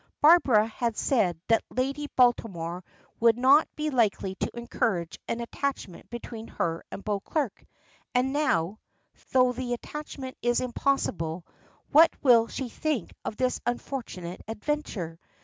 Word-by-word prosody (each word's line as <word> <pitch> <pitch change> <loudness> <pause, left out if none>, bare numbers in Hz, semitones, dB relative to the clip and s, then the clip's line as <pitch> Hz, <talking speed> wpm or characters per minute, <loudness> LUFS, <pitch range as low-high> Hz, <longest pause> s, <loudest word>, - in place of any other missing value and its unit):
Barbara 285 -9 +6
had 230 0 -2
said 185 - +1
that 225 -1 +4
Lady 275 +3 -2
Baltimore 185 -8 +1 0.4
would 230 0 +5
not 270 +5 +6
be 305 0 -2
likely 215 -6 +1
to 190 - -4
encourage 225 -8 -1
an 235 - -2
attachment 235 -6 -4
between 230 -1 -7
her 165 -1 -2
and 200 - -7
Beauclerk, 215 +5 -2 0.5
and 255 +2 +2
now, 215 - +1 0.5
though 255 -1 +4
the 245 0 -3
attachment 270 0 -7
is 240 0 +2
impossible, 190 -10 -1 0.5
what 320 +3 +8
will 235 -4 +6
she 265 - -4
think 275 - -2
of 215 - -4
this 255 -1 0
unfortunate 235 -8 -4
adventure? 220 - -3
240 Hz, 130 wpm, -27 LUFS, 200-265 Hz, 0.5 s, what